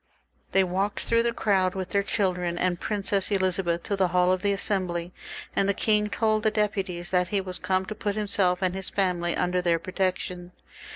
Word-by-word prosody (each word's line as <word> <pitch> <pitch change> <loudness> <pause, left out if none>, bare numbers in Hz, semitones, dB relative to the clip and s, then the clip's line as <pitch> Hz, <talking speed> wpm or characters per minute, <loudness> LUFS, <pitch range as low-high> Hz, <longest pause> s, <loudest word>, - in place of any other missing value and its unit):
They 195 - +4
walked 190 +3 -1
through 230 0 +2
the 235 0 +1
crowd 190 -5 +1
with 190 -1 -4
their 200 - +2
children 180 -4 -1
and 175 -1 0
Princess 200 -2 -1
Elizabeth 185 -3 0
to 200 - -1
the 190 -2 +2
haU 180 +1 +3
of 185 -1 0
the 205 - +1
Assembly, 185 -3 -1 0.4
and 195 - +2
the 200 - +2
king 210 0 +2
told 215 0 +1
the 220 - +3
deputies 195 -4 -2
that 180 -1 +2
he 200 +2 0
was 185 -1 0
come 185 0 0
to 215 - -5
put 205 -1 -3
himself 195 -3 +1
and 185 -1 +1
his 190 0 -3
family 180 -3 0
under 180 0 +1
their 170 -1 +2
protection. 180 0 -3
190 Hz, 195 wpm, -26 LUFS, 180-200 Hz, 0.4 s, They